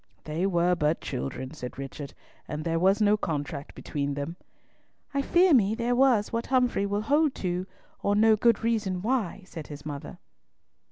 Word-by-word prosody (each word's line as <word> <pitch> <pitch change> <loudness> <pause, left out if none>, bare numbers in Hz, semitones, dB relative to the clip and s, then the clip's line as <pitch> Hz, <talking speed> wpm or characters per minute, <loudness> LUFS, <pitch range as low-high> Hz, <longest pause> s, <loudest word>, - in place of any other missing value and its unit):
"They 160 +5 -1
were 175 -1 +2
but 155 -2 +1
children," 130 0 -5
said 125 -5 -7
Richard; 135 +1 -7 0.3
"and 150 +1 -4
there 165 0 0
was 195 +4 +3
no 210 +1 +4
contract 145 -5 -4
between 140 -2 -3
them." 145 +4 -4 0.8
"I 280 - +1
fear 345 +5 +4
me 220 -4 +4
there 240 +1 0
was 245 -5 +3
what 230 0 -1
Humfrey 250 -6 +2
will 205 +1 -1
hold 290 +4 +2
to, 180 +1 -1 0.3
or 200 0 +1
know 220 +1 +5
good 230 0 +2
reason 205 -6 0
why," 220 -5 -1
said 165 -4 -8
his 145 0 -9
mother. 145 -2 -6
195 Hz, 170 wpm, -27 LUFS, 150-230 Hz, 0.8 s, know